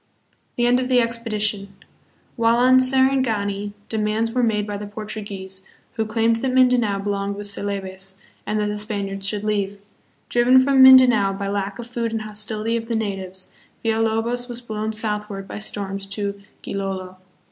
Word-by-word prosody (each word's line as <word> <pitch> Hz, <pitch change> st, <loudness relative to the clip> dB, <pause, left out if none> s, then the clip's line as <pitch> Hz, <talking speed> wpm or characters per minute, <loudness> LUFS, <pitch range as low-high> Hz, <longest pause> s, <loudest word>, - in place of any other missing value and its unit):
The 240 Hz, -, +1 dB
End 245 Hz, +1 st, +4 dB
of 255 Hz, 0 st, -2 dB
the 250 Hz, -1 st, +5 dB
Expedition. 215 Hz, -4 st, -1 dB, 0.6 s
While 230 Hz, -1 st, +3 dB
on 255 Hz, +1 st, +6 dB
Sarangani 255 Hz, -7 st, +2 dB
demands 220 Hz, +1 st, -1 dB
were 250 Hz, +1 st, +1 dB
made 215 Hz, -3 st, +1 dB
by 205 Hz, -1 st, -4 dB
the 205 Hz, 0 st, -6 dB
Portuguese, 205 Hz, -2 st, -7 dB, 0.3 s
who 220 Hz, -2 st, -2 dB
claimed 225 Hz, +1 st, +2 dB
that 260 Hz, +2 st, -1 dB
Mindanao 250 Hz, -5 st, +3 dB
belonged 200 Hz, 0 st, -2 dB
with 205 Hz, +1 st, -6 dB
Celebes, 190 Hz, -2 st, -4 dB, 0.3 s
and 215 Hz, -, -1 dB
that 210 Hz, -, +1 dB
the 210 Hz, 0 st, -2 dB
Span 205 Hz, -2 st, -3 dB
iards 195 Hz, 0 st, -4 dB
should 210 Hz, -1 st, -3 dB
leave. 205 Hz, -2 st, -1 dB, 0.5 s
Driven 245 Hz, +2 st, +5 dB
from 265 Hz, 0 st, +4 dB
Mindanao 250 Hz, -7 st, +7 dB
by 195 Hz, 0 st, -4 dB
lack 200 Hz, 0 st, -2 dB
of 240 Hz, -, -6 dB
food 235 Hz, -1 st, -3 dB
and 220 Hz, -1 st, -2 dB
hostility 215 Hz, +1 st, -2 dB
of 230 Hz, -1 st, -3 dB
the 230 Hz, -, -1 dB
natives, 190 Hz, -3 st, -3 dB, 0.3 s
Villalobos 225 Hz, +2 st, 0 dB
was 240 Hz, -1 st, -5 dB
blown 220 Hz, -2 st, -4 dB
southward 210 Hz, -2 st, -3 dB
by -, -, -6 dB
storms 195 Hz, -2 st, -4 dB
to 200 Hz, 0 st, -4 dB, 0.2 s
Gilolo. 190 Hz, -2 st, -4 dB
215 Hz, 165 wpm, -22 LUFS, 200-235 Hz, 0.6 s, Mindanao